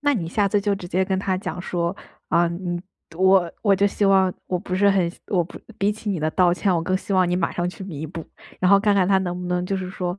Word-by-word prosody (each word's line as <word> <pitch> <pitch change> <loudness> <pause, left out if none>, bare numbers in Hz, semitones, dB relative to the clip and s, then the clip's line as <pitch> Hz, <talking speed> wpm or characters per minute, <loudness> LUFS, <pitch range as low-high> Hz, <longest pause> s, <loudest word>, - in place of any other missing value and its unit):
那 290 0 +2
你 170 -8 -3
下 200 +3 +1
次 205 +1 +1
就 200 0 +1
直 185 -2 -8
接 185 +1 +1
跟 190 0 -1
他 190 -1 -1
讲 180 -2 -5
说： 175 0 -2 0.3
“啊， 175 - +3
你 175 0 -4 0.4
我 190 -1 +4
我 200 -3 +4
就 200 +1 +3
希 205 - -1
望 190 -2 +4
我 180 - -1
不 180 - -5
是 200 +2 +4
很 185 -3 +1 0.2
我 180 -4 +2
不 170 - -11 0.2
比 200 +1 +2
起 215 0 -5
你 185 -5 -2
的 155 +1 0
道 180 -2 +4
歉 180 +1 +1
我 165 - 0
更 185 +3 0
希 195 - -5
望 185 -2 +3
你 175 - +1
马 170 - 0
上 175 0 -1
去 185 - -8
弥 160 -5 -6
补。 165 +1 -7 0.4
“然 185 - +3
后 200 - +7
看 205 0 +2
看 190 -2 +3
他 195 -1 +4
能 180 -1 -3
不 180 - -5
能 180 0 0
就 195 - -1
是 185 -1 -4
说 180 0 -4
185 Hz, 300 characters per minute, -23 LUFS, 175-195 Hz, 0.4 s, 后